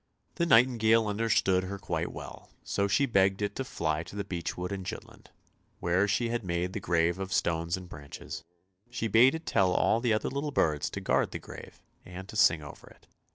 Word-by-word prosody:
The 170 - +1
nightingale 115 -4 +5
understood 100 -3 +1
her 100 +2 -5
quite - - -3
well, - - -10
so 100 0 0
she 120 +8 +2
begged 95 -5 +2
it 100 0 -2
to 135 - -1
fly 80 -10 -2
to 90 - -11
the 100 - -2
beech 85 -4 -4
wood 90 +1 -4
in 100 -1 -4
Jutland, - - -9 0.5
where 90 +4 +2
she 115 +4 0
had 120 -1 -2
made 90 0 -2
the 105 - -3
grave 85 0 +1
of 95 0 -5
stones 85 0 0
and 90 -1 -9
branches; 75 0 -9 0.5
she 115 -2 -2
bade 120 +7 +5
it 160 - -7
tell 95 -2 +2
all 110 - +2
the 120 -2 +2
other 110 - 0
little 140 +2 -2
birds 75 - +1
to - - -6
guard - - +1
the - - -5
grave - - -12 0.2
and 90 +1 -9
to - - -9
sing 80 -7 +4
over 75 - -12
it. - - -21
95 Hz, 205 wpm, -29 LUFS, 85-115 Hz, 0.5 s, nightingale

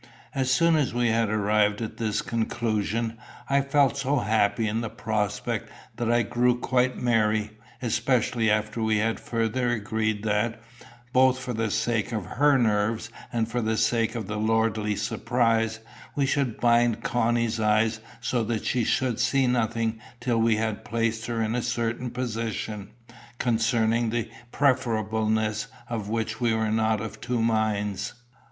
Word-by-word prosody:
As 130 -1 0
soon 165 +3 +4
as 140 -5 0
we 120 -1 +2
had 115 -1 +2
arrived 105 0 +2
at 115 -2 -5
this 110 -2 -1
conclusion, 115 0 -1 0.3
I 140 0 +3
felt 140 0 +2
so 135 +2 +1
happy 110 -1 +1
in 110 +2 -1
the 115 - -3
prospect 105 -3 -2 0.3
that 120 -1 0
I 120 0 +3
grew 125 +2 +2
quite 125 +1 +1
merry, 110 -3 +1 0.3
especially 120 -1 +1
after 110 +2 0
we 110 -1 +2
had 115 +2 0
further 115 +2 -1
agreed 110 -2 -1
that, 110 +2 0 0.5
both 130 0 +5
for 125 -1 -4
the 115 -1 -1
sake 110 +1 0
of 110 -5 -3
her 145 +2 +3
nerves 110 -1 +1 0.2
and 115 -2 0
for 120 +1 -2
the 110 0 0
sake 115 +1 +1
of 115 -3 -3
the 105 +2 -4
lordly 110 -1 +1
surprise, 115 +1 0 0.4
we 140 - +2
should 135 -4 0
bind 120 -1 +3
Connie's 115 0 +1
eyes 110 +1 +2 0.2
so 120 0 0
that 110 -1 -2
she 125 - +1
should 125 0 0
see 130 +2 +2
nothing 115 -2 0 0.2
till 120 -2 0
we 115 0 +3
had 110 -1 -2
placed 115 0 -1
her 115 -2 -1
in 110 +1 -1
a 125 - 0
certain 120 +1 -2
position, 110 -4 -4 0.5
concerning 115 -1 +1
the 115 -1 -2 0.2
preferableness 110 -5 +1 0.2
of 110 -4 -4
which 110 0 -2
we 115 -2 +2
were 110 -1 0
not 110 -1 +1
of 110 -1 -7
two 120 -1 -1
minds. 110 -3 0
115 Hz, 155 wpm, -26 LUFS, 110-120 Hz, 0.5 s, both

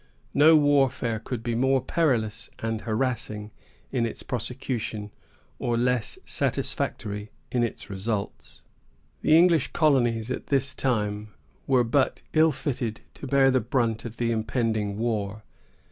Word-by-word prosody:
No 155 +3 +7
warfare 135 -6 +2
could 115 0 -5
be 120 0 -1
more 130 +3 +3
perilous 125 -8 0
and 115 -1 -3
harassing 110 -3 -2 0.4
in 125 -3 0
its - - -8
prosecution, 120 -4 -4 0.5
or 120 -1 0
less 125 -2 +1
satisfactory 105 0 -1 0.2
in 125 - +1
its 120 - -3
results. 100 +1 -4 0.6
The 155 - +5
English 170 -4 +4
colonies 125 -7 +2
at - - -4
this 135 -1 +1
time 105 -5 -1 0.3
were 130 -2 +4
but 130 +3 +1
ill 160 0 +5
fitted 120 -6 -3
to 140 - -8
bear 135 0 +4
the 130 - +2
brunt 115 -1 0
of 115 -1 -8
the 115 -1 0
impending 110 -2 -1
war. 105 -2 -2
120 Hz, 130 wpm, -26 LUFS, 110-135 Hz, 0.6 s, No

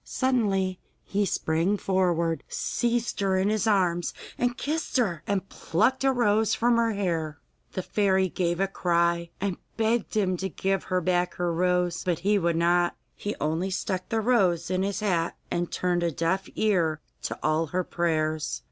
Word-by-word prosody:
Suddenly 200 -8 0 0.2
he 200 0 0
sprang 165 +5 +1
forward, 175 -4 +1
seized 240 0 -1
her 195 -2 +2
in 190 +2 +2
his 215 +1 0
arms 180 -5 +1 0.2
and 245 0 0
kissed 310 -1 -2
her, 185 -10 +1
and 195 -1 -1
plucked 225 +10 0
a 270 - +4
rose 220 -3 +2
from 235 0 +3
her 230 -1 +2
hair. 165 -6 -2 0.4
The 185 - -3
fairy 190 -2 +2
gave 175 -1 -1
a 195 - +2
cry, 170 -2 +1
and 195 -2 -2 0.2
begged 225 -1 0
him 185 -3 +1
to 190 +2 -3
give 195 +2 -1
her 185 -1 0
back 180 0 +1
her 175 -1 -1
rose, 180 0 +1
but 175 -3 0
he 205 0 +4
would 170 -2 +1
not. 175 +1 +2 0.2
He 205 - -4
only 160 +5 0
stuck 185 0 -3
the 225 -1 +1
rose 185 -8 +2
in 185 0 +1
his 200 +2 -1
hat, 175 -5 0
and 175 0 -1
turned 180 -1 0
a 170 - +1
deaf 165 +5 -1
ear 170 -8 +1 0.2
to - - -4
all 155 +2 +1
her 180 +5 -1
prayers. 155 -3 -1
185 Hz, 175 wpm, -27 LUFS, 170-205 Hz, 0.4 s, a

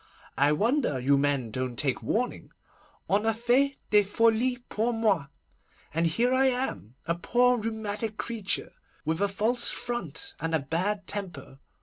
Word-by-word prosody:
I 145 +1 +5
wonder 210 - +1
you 135 +3 +3
men 140 -4 0
don't 130 +1 -3
take 135 -4 0
warning. 245 +3 -2 0.6
On 200 +2 +2
a 225 0 +1
fait 250 +4 +2 0.2
des 210 -1 +7
folies 230 +4 +2
pour 230 +3 0
moi, 210 -10 +1 0.7
and 165 +2 +2
here 240 +10 +1
I 265 +1 +4
am, 245 - -2
a 170 - +1
poor 245 +7 +2
rheumatic 220 -1 -3
creature, 225 -5 -3 0.3
with 160 +4 -1
a 200 - +3
false 225 +5 +1
front 240 -12 -3
and 165 +1 -1
a - - +2
bad 185 +9 -1
temper. 175 -10 -6
210 Hz, 150 wpm, -28 LUFS, 155-235 Hz, 0.7 s, des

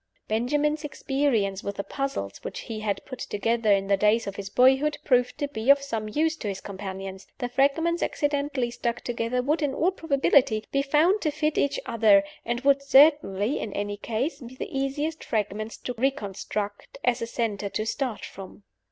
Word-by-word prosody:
Benjamin's 295 +7 0
experience 270 -9 0
with 200 - -4
the 200 - -3
"Puzzles" 235 - -4
which - - -5
he 225 -2 -6
had 210 -2 -2
put 255 - -8
together 225 +1 0
in 195 -1 +3
the 200 0 +3
days 210 +3 +3
of 200 - -5
his 200 -1 -6
boyhood 265 +6 +4
proved 250 -2 +2
to 290 -1 -1
be 235 -3 -4
of 280 0 +8
some 225 -6 -4
use 315 +7 +1
to 220 - -5
his 195 -1 -3
companions. 190 -1 -7
The 245 - -2
fragments 305 +7 +2
accidentally 285 -4 -1
stuck 240 0 -2
together 240 +1 -1
would, 300 +5 +1
in 280 -2 0
all 355 +4 +2
probability, 275 - +2
be 275 - +2
found 310 +9 +3
to 310 - +1
fit 305 +1 -1
each 280 0 +1
other, 210 -3 +5 0.2
and 240 +1 -2
would 275 0 +4
certainly 275 -6 +4
(in 205 - -5
any 205 0 -2
case) 240 +8 -3
be 250 -1 -10
the 260 - -6
easiest 290 +4 -2
fragments 215 0 -2
to 250 - -5
reconstruct 210 -5 -3
as 245 -1 +1
a 230 - -2
center 210 -4 -2
to 215 - -2
start 245 0 -2
from. 190 - -11
245 Hz, 185 wpm, -26 LUFS, 210-280 Hz, 0.2 s, of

